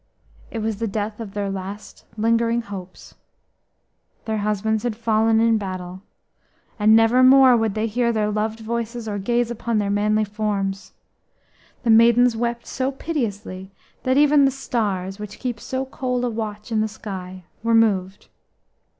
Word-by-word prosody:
It 225 -2 -4
was 220 -2 -2
the 225 +1 -2
death 210 +1 -3
of 210 -3 -8
their 200 -1 -2
last 195 +2 -8
lingering 230 +1 +1
hopes. 190 -3 -10 1.1
Their 220 -1 -1
husbands 210 +1 0
had 240 -2 -2
fallen 225 0 +2
in 225 -1 +3
battle, 185 -2 -6 0.8
and 215 +1 +6
never 225 +3 +5
more 260 -1 +7
would 225 -3 0
they 215 +1 0
hear 235 +2 0
their 210 -2 0
loved 215 +1 -2
voices 235 +1 -4
or 205 -1 -3
gaze 240 +3 0
upon 235 -1 -2
their 205 -1 0
manly 210 +1 +2
forms. 205 -2 -3 0.9
The 235 - +3
maidens 235 +1 +5
wept 235 +1 -2
so 265 +1 -2
piteously 215 - -4 0.3
that 260 +1 +1
even 295 0 +5
the - - +4
stars 205 -8 -3
which 210 0 -8
keep 245 -3 -4
so 260 0 -3
cold 250 -2 -3
a 245 - -1
watch 215 0 -5
in 220 -1 +1
the 220 - +1
sky 190 -4 -8 0.2
were 230 0 +2
moved. 200 -4 +1
220 Hz, 160 wpm, -22 LUFS, 205-235 Hz, 1.1 s, more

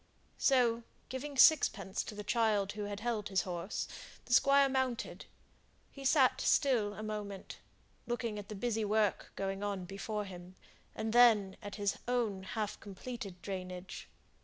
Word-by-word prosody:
So, 240 -4 +3 0.3
giving 275 +2 -5
sixpence 255 -9 +5
to 210 - -7
the 210 - -6
child 210 -2 +1
who 210 0 -5
had 205 0 -5
held 225 -3 -2
his 190 -2 +1
horse, 180 +2 -4 0.4
the 245 - -2
Squire 275 +1 +6
mounted. 260 -3 -2 0.7
He 275 -1 -10
sate 265 -2 +4
still 230 -8 +2
a 215 - -6
moment, 210 -2 -6 0.5
looking 235 -3 -2
at 205 - -10
the 215 - -5
busy 225 +1 -1
work 210 -1 +1
going 195 0 -3
on 200 -3 -3
before 205 +3 -4
him, 180 -1 -10 0.4
and 220 0 -2
then 220 -5 +6
at 205 - -7
his 205 -1 -1
own 235 -6 0
half 210 +2 -4
completed 200 -3 -8
drainage. 185 -1 -6
210 Hz, 150 wpm, -33 LUFS, 195-240 Hz, 0.7 s, Squire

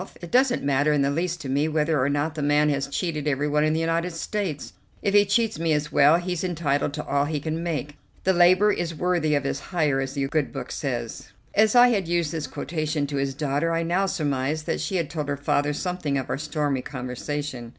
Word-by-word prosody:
It 175 -1 -9
doesn't 255 0 +3
matter 140 +2 +2
in 145 -2 +2
the 140 - +1
least 170 +2 -2
to 140 - -6
me 140 +3 +1
whether 155 -1 +1
or 135 - +1
not 145 +2 0
the 155 - -5
man 145 +1 +3
has 140 -1 -1
cheated 150 +1 -3
everyone 150 +1 +1
in 155 0 +2
the 160 - 0
United 165 +2 0
States. 165 -3 -4 0.3
If 200 - +1
he 205 0 +6
cheats 220 -1 +1
me 165 -1 +1
as 150 0 -1
well, 145 +3 +6
he's 180 -1 -3
entitled 155 -6 0
to 150 - -5
all 140 0 +1
he 150 0 -2
can 160 +2 -3
make. 150 -4 -3 0.3
'The 190 - +3
laborer 185 +4 +5
is 170 -1 -3
worthy 170 -3 +1
of 140 - 0
his 140 0 -2
hire,' 150 -7 0
as 135 0 -4
the 140 -1 -1
good 150 0 -1
Book 135 -2 -6
says." 120 -5 -4 0.3
As 215 +2 +3
I 245 0 +8
had 200 -7 0
used 170 -3 0
this 160 -2 -3
quotation 155 -3 -2
to 140 0 -4
his 135 -1 -1
daughter, 150 +3 0
I 165 0 0
now 180 +4 +1
surmised 150 -2 -1
that - - -2
she 195 - -2
had 170 -4 0
told 150 -1 -4
her 140 - -1
father 145 +1 +1
something 155 -3 -2
of 135 - -3
our - - -1
stormy 150 -3 -1
conversation. 130 0 -5
150 Hz, 230 wpm, -25 LUFS, 140-170 Hz, 0.3 s, I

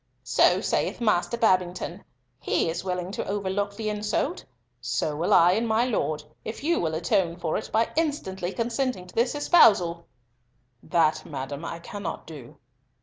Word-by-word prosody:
"So - - +3
saith - - -1
Master 225 0 +1
Babington. 185 -4 0 0.4
He 165 - 0
is 170 - -4
willing 180 -1 -3
to - - -4
overlook 200 0 -2
the 220 -1 -3
insult, 210 0 -2 0.4
so 130 +5 -1
will 165 +4 -1
I 170 +1 +7
and 225 +5 +1
my 225 +2 +2
Lord, 155 -11 -1 0.2
if 220 +4 -6
you 335 +3 +2
will 160 -2 -1
atone 175 0 +1
for 170 -3 -2
it 215 - -3
by 225 +1 +1
instantly 195 - -1
consenting 240 -3 -2
to 180 - -15
this 240 +4 +1
espousal." 200 - +4 0.7
"That, 155 -2 +1
madam, 140 +1 -6
I 165 - -5
cannot 195 +3 -6
do." 145 -7 -11
190 Hz, 155 wpm, -26 LUFS, 170-220 Hz, 0.7 s, I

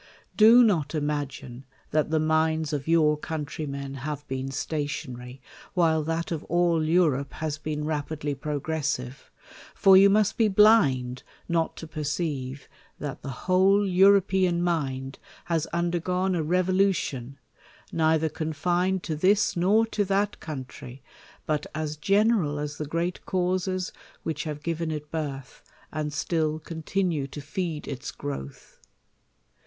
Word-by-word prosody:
Do 230 +3 +8
not 165 -9 +1
imagine 145 -4 -3 0.3
that 155 -1 +1
the 160 0 +2
minds 160 0 +1
of 140 -1 -3
your 160 -2 +4
countrymen 145 -3 -5
have 145 0 -5
been 130 0 -3
stationary, 135 -3 -4 0.3
while 160 -3 +3
that 165 +2 -2
of 165 -2 -3
all 170 -2 +2
Europe 155 -4 +2
has 155 -1 -4
been 150 -1 -3
rapidly 150 -1 -2
progressive; 145 -2 -3 0.5
for 195 -1 +6
you 195 +1 +8
must 205 0 +2
be 225 - +5
blind 150 - +4 0.3
not 165 -1 0
to - - -7
per 155 0 -6
ceive, 145 -3 -3 0.3
that 145 0 -6
the 135 -4 -7
whole 190 +2 +4
European 190 -2 +4
mind 135 -6 -2 0.3
has 165 -2 0
undergone 175 +2 0
a 170 - 0
revolution, 180 -6 0 0.5
neither 160 -1 +2
confined 175 +4 -1
to 160 - -2
this 195 +6 +3
nor 200 +6 +3
to 220 -2 -1
that 200 +1 0
country; 130 -3 -8 0.4
but 150 -1 -1
as 155 -1 -3
general 195 -2 +2
as 145 0 -5
the 150 - -3
great 170 +4 -2
causes 185 0 -1 0.3
which 155 -1 -3
have 150 -1 -5
given 165 -1 -2
it 150 -1 -5
"kirth, 140 -5 -5 0.3
and 150 0 -3
still 155 +1 0
continue 160 -1 -2
to 145 - -8
feed 155 +2 -4
its 135 - -5
growth. 70 -1 -7
155 Hz, 135 wpm, -26 LUFS, 145-180 Hz, 0.5 s, Do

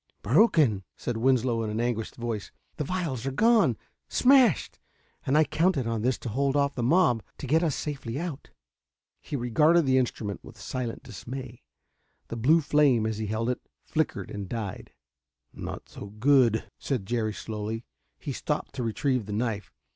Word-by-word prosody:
"Broken!" 135 - +4
said 120 -2 -3
Winslow 120 -1 +2
in 110 - -2
an 105 +1 -2
anguished 120 -2 -2
voice. 115 -4 -4 0.3
"The - - -1
vials 155 -7 -2
are - - 0
gone 210 - +4 0.3
smashed! 255 - +4 0.5
And 135 +3 +3
I 155 - +6
counted 160 -4 +1
on 115 -1 -1
this 125 +2 +1
to 120 - -4
hold 135 +4 0
off 140 -1 +2
the 125 - -3
mob, 125 -3 +3 0.2
to - - -6
get 155 +5 +3
us 160 -5 +1
safely 135 -5 -4
out...." 165 -5 -5 0.7
He - - -5
regarded 150 +7 +3
the 130 0 +4
instrument 110 -5 -3
with - - -13
silent 125 -3 -4
dismay. 125 +3 -8 0.7
The - - -4
blue 145 +9 +4
flame, 140 -6 +3
as 110 -1 -2
he 110 - -2
held 110 +3 0
it, 125 - -4 0.2
flickered - - -2
and 100 -2 -6
died. 110 -5 -5 0.6
"Not - - -7
so 100 - -9
good!" 115 +1 +3 0.2
said 125 -8 -2
Jerry 110 -1 -1
slowly. 110 +1 -5 0.3
He - - -5
stopped - - -3
to 125 - -3
retrieve 120 0 0
the 105 - -4
knife. 105 -3 -2
125 Hz, 170 wpm, -27 LUFS, 110-145 Hz, 0.7 s, I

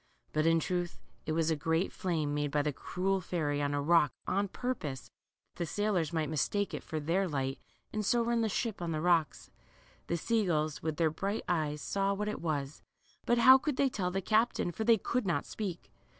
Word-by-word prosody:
" - - -40
But 155 +1 +2
in 165 0 +4
truth 175 +1 -2 0.3
it 155 - 0
was 165 0 +1
a - - +2
great 160 +4 0
flame 160 -5 -1
made 145 0 0
by 145 +1 +1
the 150 -1 -1
cruel 190 +6 -1
fairy 150 -5 -1
on 145 0 0
a 145 - 0
rock 165 -1 +4
on 200 +1 0
purpose 185 - -4 0.5
that - - -24
the 170 - 0
sailors 190 -4 0
might 160 -2 0
mistake 195 +7 0
it - - -3
for 160 - -4
their 175 +6 +1
light, 135 -3 -2 0.3
and 215 - -1
so 235 +3 +2
run 235 0 +1
the 220 - +1
ship 215 0 -2
on 170 -1 -2
the 155 - -1
rocks. 170 -2 +1 0.6
The 170 - 0
sea 225 +6 +1
gulls, 155 -2 0
with 155 -1 -2
their 160 -2 +2
bright 200 +6 -2
eyes, 150 -4 -1
saw 200 0 0
what 210 +1 -2
it - - -4
was, 145 -3 -3 0.5
but 240 - +4
how 260 +3 +8
could 290 -1 -2
they 275 - +3
tell 190 -7 -2
the 195 +2 -2
captain, 215 -2 +2
for 220 - -3
they 230 0 +6
could 235 +2 -1
not 165 -5 0
speak. 190 -5 -5
175 Hz, 220 wpm, -32 LUFS, 155-205 Hz, 0.6 s, how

